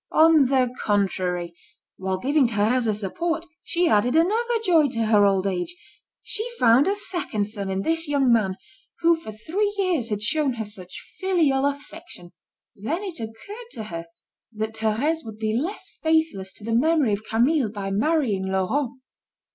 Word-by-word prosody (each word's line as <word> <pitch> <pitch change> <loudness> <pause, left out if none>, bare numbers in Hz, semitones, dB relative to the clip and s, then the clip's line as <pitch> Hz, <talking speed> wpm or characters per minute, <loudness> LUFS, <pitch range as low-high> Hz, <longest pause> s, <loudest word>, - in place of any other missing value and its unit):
On 315 -3 +6
the 255 -2 +2
contrary, 185 -4 0 0.4
while 190 0 -2
giving 275 +5 +2
Thérèse 230 +2 +1
a 215 - +2
support, 330 - -2 0.2
she 345 +1 0
added 240 +1 +3
another 450 +8 +2
joy 325 -5 +5
to 230 -4 -2
her 210 -2 +5
old 195 -1 +1
age, 195 - -2 0.5
she 435 - 0
found 240 +6 +5
a 395 - +2
second 350 - -2
son 200 -2 -5
in 190 0 -2
this 325 0 0
young 275 -4 +3
man 195 -5 +1 0.5
who 335 0 +5
for 325 -9 -9
three 355 - -1
years 350 - 0
had 210 -1 -3
shown 285 +4 +1
her 225 -2 -4
such 185 -3 -9
filial 315 -8 +2
affection. 285 - -7 0.4
Then 285 - -3
it 370 -8 -5
occurred 230 - -8
to 225 - -5
her 170 -5 -7 0.5
that 220 +1 -3
Thérèse 225 +9 0
would 220 -1 -9
be 215 0 -1
less 330 - -4
faithless 315 -12 +1
to - - -11
the 225 +1 -2
memory 290 -2 +3
of 200 +2 -3
Camille 240 +3 +2
by 200 -2 -5
marrying 215 -4 +1
Laurent. 190 +8 0
240 Hz, 165 wpm, -24 LUFS, 205-320 Hz, 0.5 s, On